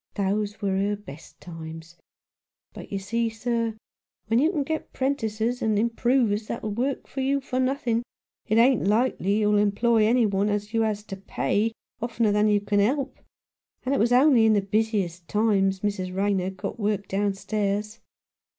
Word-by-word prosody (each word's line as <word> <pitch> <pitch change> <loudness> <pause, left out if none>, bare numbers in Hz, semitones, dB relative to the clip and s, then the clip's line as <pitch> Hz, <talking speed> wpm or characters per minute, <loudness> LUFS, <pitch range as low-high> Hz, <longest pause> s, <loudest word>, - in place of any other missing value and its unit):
Those 205 +1 -1
was 195 - +1
her 205 +1 0
best 165 -7 -13
times. 165 0 -9 0.8
But, - - -10
you 200 - -1
see, 230 +4 -1
sir, 230 0 -2 0.5
when 225 +2 +2
you 310 +6 +3
can 300 -6 -1
get 315 +3 -4
'prentices 245 -3 -1
and 220 -3 +1
improvers 230 -1 +1
that'll 215 -2 -4
work 255 +6 -2
for 270 - -5
you 275 +1 +1
for 260 -1 -3
nothing, 255 -3 0 0.5
it 215 - +2
ain't 240 -3 +4
likely 210 -2 +1
you'll 210 -1 +3
employ 215 +2 +3
any 240 +1 +4
one 200 0 +1
as 205 +1 -2
you 225 - +2
has 215 -2 -1
to 195 -2 -7
pay, 205 +2 -1 0.3
oftener 230 -2 +1
than 210 +1 +3
you 205 -1 +3
can 205 0 0
help, 265 +6 0 0.7
and 265 - +1
it 275 - +1
was 230 +3 +2
only 250 -3 +5
in 220 - +5
the 205 - +3
busiest 195 -4 -1
times 195 -3 +1
Mrs. 185 -3 -2
Rayner 195 -2 +1
got 190 +4 -6
work 205 -2 -1
downstairs. 205 +2 -1
215 Hz, 170 wpm, -25 LUFS, 200-235 Hz, 0.8 s, only